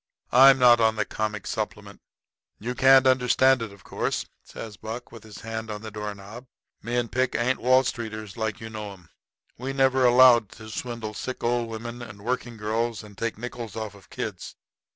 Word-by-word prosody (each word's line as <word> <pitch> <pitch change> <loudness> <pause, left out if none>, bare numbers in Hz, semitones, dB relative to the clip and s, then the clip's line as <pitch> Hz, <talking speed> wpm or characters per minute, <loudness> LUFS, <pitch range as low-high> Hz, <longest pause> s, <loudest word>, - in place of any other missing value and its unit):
I'm 135 +2 +8
not 120 -2 +6
on 110 -1 +3
the 105 -1 0
comic 105 -1 -3
supplement." - - -5 0.6
"You 120 +4 -4
can't 135 +1 +6
understand 130 0 +4
it, 115 -3 -5
of 100 -2 -16
course," - - -2 0.2
says 110 -2 -9
Buck, 115 +3 -7
with 115 -2 -11
his 110 -1 -12
hand 110 0 -5
on 105 0 -6
the 110 - -7
door 105 -1 -5
knob. 105 +6 -11 0.3
"Me 120 +3 -4
and 120 -2 -1
Pick 130 +1 0
ain't 125 +2 +1
Wall 130 +2 +4
Streeters 110 -4 -5
like 110 -3 -3
you 110 -1 -8
know 105 -2 -6
'em. 90 -3 -18 0.5
We 130 +2 -4
never 135 -1 +3
allowed 120 -3 +6
to 110 -1 -11
swindle 115 -1 -5
sick 130 +4 -6
old 120 -1 0
women 115 +2 -7
and 105 -3 -10
working 120 -1 -3
girls 110 +1 -2
and 105 -1 -13
take 115 +1 -3
nickels 120 -2 -7
off 110 -2 -5
of 100 -2 -18
kids. - - -6
115 Hz, 195 wpm, -25 LUFS, 110-125 Hz, 0.6 s, I'm